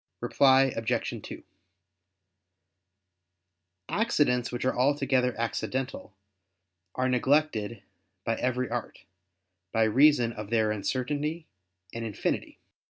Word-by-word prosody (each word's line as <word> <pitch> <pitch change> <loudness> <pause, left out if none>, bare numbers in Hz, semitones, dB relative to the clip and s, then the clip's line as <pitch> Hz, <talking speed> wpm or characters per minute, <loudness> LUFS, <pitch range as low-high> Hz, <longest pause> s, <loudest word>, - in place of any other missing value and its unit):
Reply 135 -1 +4
Obj. 115 0 -2
2: - - -9 2.4
Accidents 145 - +1
which 120 +1 -3
are 130 - +1
altogether 130 -3 +1
accidental 125 -1 -3 0.8
are 130 0 +1
neglected 125 -5 +1 0.4
by 115 - +1
every 125 0 -1
art, 120 -1 -5 0.7
by 115 - +2
reason 125 +1 +4
of 105 -2 -7
their 110 -2 +2
uncertainty 145 +9 -2 0.5
and 115 - -4
infinity. 110 -3 -3
125 Hz, 95 wpm, -28 LUFS, 115-135 Hz, 2.4 s, Reply